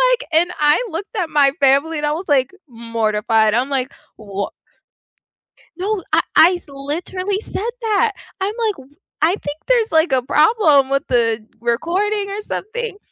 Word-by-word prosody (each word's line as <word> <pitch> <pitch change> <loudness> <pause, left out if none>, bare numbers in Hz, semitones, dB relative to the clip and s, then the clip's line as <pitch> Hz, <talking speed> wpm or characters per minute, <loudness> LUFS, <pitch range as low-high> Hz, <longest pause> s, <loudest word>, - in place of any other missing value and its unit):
like - - -10
and 340 +3 +3
I 295 +9 +3
looked 390 +6 -6
at 345 -4 -1
my 285 -2 +4
family 280 +4 +3
and 295 - -2
I 295 - +1
was 335 +5 -3
like 270 -4 +2 0.2
mortified. 225 -2 0
I'm 250 +4 +1
like, 270 -2 -2 0.2
"Wha" 200 -2 -5 1.3
No, 400 +2 -2
I - - +5 0.2
I 345 +3 +7
s 350 - -9
literally 345 +8 -3
said 445 +1 -4
that. 440 0 +1 0.3
I'm 395 +2 -1
like, 410 - -2 0.3
"I 335 +5 +3
think 290 -6 -6
there's 475 -3 +2
like 320 -2 +3
a 260 - +3
problem 300 - +3
with 275 0 +1
the 230 -3 +1 0.2
recording 385 - -1
or 405 +2 -4
something." 445 +1 -5
310 Hz, 160 wpm, -19 LUFS, 260-400 Hz, 1.3 s, I